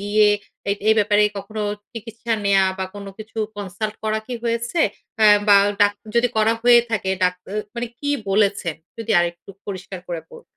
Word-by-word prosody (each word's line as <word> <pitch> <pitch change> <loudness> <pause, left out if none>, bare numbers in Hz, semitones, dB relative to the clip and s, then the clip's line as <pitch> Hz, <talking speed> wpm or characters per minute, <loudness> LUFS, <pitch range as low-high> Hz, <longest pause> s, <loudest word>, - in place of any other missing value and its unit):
গিয়ে 210 +1 +3 0.4
এ - - +4 0.2
এই 220 - +6
ব্যাপারে 210 0 +4 0.2
কখনো 210 +2 -5 0.3
চিকিৎসা 230 +1 -5
নেয়া 195 -1 +4
বা 190 - -1
কোনো 200 -1 -7
কিছু 220 +1 -9 0.2
consult 205 +2 -4
করা 215 0 +1
কি 250 - -4
হয়েছে? 235 +7 -1 0.4
অ্যা 215 - +6 0.2
বা 200 - +9 0.3
ডাক্তা 205 0 +1
যদি 245 +1 +4
করা 220 +1 +4
হয়ে 240 -1 +7
থাকে 195 -4 -1
ডাক 180 0 +3 0.2
এ - - -2 0.2
মানে 240 +1 -3
কী 285 0 -2 0.2
বলেছে? 200 -3 +2 0.3
যদি 225 0 -5
আরেকটু 175 +2 -2 0.2
পরিষ্কার 190 -1 -6
করে 170 -2 -3
বল 475 0 -12
210 Hz, 175 wpm, -21 LUFS, 200-230 Hz, 0.4 s, বা